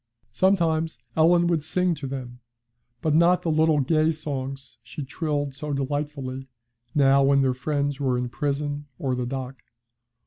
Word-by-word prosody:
Sometimes 165 - +1 0.2
Ellen 170 +2 +5
would 170 -3 +1
sing 180 +3 +1
to 150 -3 -5
them, 125 -2 -6 0.6
but 155 - +2
not 170 +3 +4
the 165 - 0
little 155 -1 +3
gay 155 +3 +2
songs 135 -4 -5
she 145 - -7
trilled 145 0 -2
so 145 +2 -4
delightfully, 135 -1 -3 0.5
now 140 -1 +5
when 140 0 +4
their 130 -1 +2
friends 140 +1 -2
were 130 -3 +1
in 125 0 -1
prison 145 +2 -3
or 130 -2 -1
the 125 -1 -2
dock. 130 0 -5
145 Hz, 150 wpm, -25 LUFS, 135-155 Hz, 0.6 s, Ellen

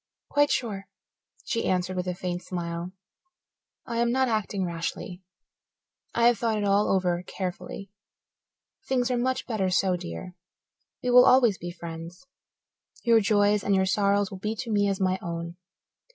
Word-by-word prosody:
"Quite 290 0 +4
sure," 200 -5 -2 0.6
she 230 -4 -1
answered, 185 0 0
with 180 0 -2
a 180 - -2
faint 180 -1 -3
smile. 170 -1 -4 0.9
"I 230 - -3
am 235 0 +2
not 260 +1 +2
acting 215 -4 -1
rashly. 175 +2 -5 0.9
I 235 - +3
have 240 -3 +4
thought 225 -2 0
it 210 - -1
all 200 +1 +3
over 180 -2 +1
carefully. 185 +1 -6 1.0
Things 255 -1 +1
are - - +2
much 260 +1 -1
better 210 -6 -1
so, 185 0 +2
dear. 85 - -7 0.7
We 250 - +1
will 250 0 +8
always 240 -6 +5
be 175 - -5
friends. 170 +4 -8 0.8
Your 230 -2 +5
joys 205 -1 +3
and 190 -1 +2
sorrows 200 +1 +2
will 190 - -7
be 215 +3 -2
to 230 +1 -5
me 205 -1 +2
as 195 - -1
my 185 -1 +1
own. 170 0 -5
195 Hz, 155 wpm, -27 LUFS, 180-230 Hz, 1.0 s, will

